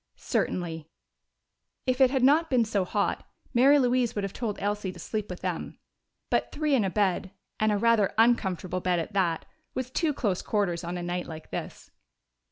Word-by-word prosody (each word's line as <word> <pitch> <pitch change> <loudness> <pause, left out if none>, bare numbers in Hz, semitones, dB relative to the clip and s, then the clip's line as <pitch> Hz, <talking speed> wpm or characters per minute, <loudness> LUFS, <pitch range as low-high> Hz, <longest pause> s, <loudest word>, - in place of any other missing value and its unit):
"Certainly." 165 -3 -2 1.0
If 255 0 +1
it 260 - +7
had 265 -1 0
not 305 +5 +5
been 245 -3 +3
so 205 -4 0
hot, 200 +2 -1 0.3
Mary 270 +4 +6
Louise 250 -3 +2
would 205 - -1
have 195 - -3
told 220 -4 -3
Elsie 205 -2 -2
to 180 - -13
sleep 210 +4 -4
with 180 - -7
them. 180 -3 -4 0.5
But - - +1
three 305 -1 0
in 250 -6 +4
a 195 - +1
bed, 190 -1 0 0.3
and 215 0 +3
a 205 - +2
rather 225 -2 +3
uncomfortable 190 -6 +2
bed 180 -1 +1
at 170 +5 -3
that, 175 -5 +1 0.3
was 260 -1 -3
too 320 +3 +1
close 205 -10 -1
quarters 190 -5 -1
on 175 +1 -4
a 175 - -4
night 175 +1 -3
like 160 -1 -9
this. - - -6
205 Hz, 185 wpm, -27 LUFS, 180-245 Hz, 1.0 s, it